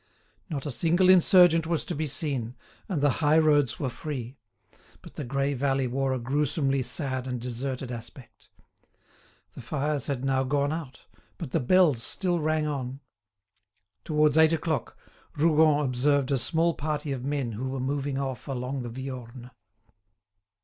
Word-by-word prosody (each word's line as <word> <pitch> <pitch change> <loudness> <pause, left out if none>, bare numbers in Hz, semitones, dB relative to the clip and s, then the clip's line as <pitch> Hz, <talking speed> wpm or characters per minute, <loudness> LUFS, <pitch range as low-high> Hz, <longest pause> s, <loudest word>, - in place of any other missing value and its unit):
Not 145 -5 -4
a 145 - -3
single 175 +7 +2
insurgent 175 -2 +6
was 165 -3 -1
to - - -3
be 155 +1 -2
seen, 130 -5 -2 0.3
and 160 -7 -1
the 145 - +4
high 150 +1 +4
roads 150 -4 +3
were 140 - -1
free; 130 -2 -6 0.7
but - - -12
the - - -5
grey 140 +2 -1
valley 135 0 0
wore 135 +2 -1
a 130 - 0
gruesomely 135 +2 0
sad 130 -1 -3
and 125 -1 -3
deserted 125 +1 -4
aspect. 120 +1 -11 1.0
The - - -10
fires 145 +2 -2
had 135 -2 -2
now 135 -1 +1
gone 140 +2 0
out, 160 -5 -7 0.4
but 165 -8 -6
the 165 - +1
bells 155 -3 +3
still 175 - 0
rang 155 0 0
on. 135 -2 -4 1.0
Towards 150 -1 +3
eight 160 0 +6
o'clock, 155 -5 -2 0.4
Rougon 155 -1 +4
observed 135 +2 +1
a 135 - +2
small 165 +7 +1
party 150 -1 -3
of 130 -2 -4
men 140 -3 -2
who 125 +5 -4
were 135 0 -4
moving 140 +1 -2
off 135 -1 -4
along 130 0 -3
the 120 - -5
Viorne. 125 -1 -8
140 Hz, 155 wpm, -27 LUFS, 130-155 Hz, 1.0 s, insurgent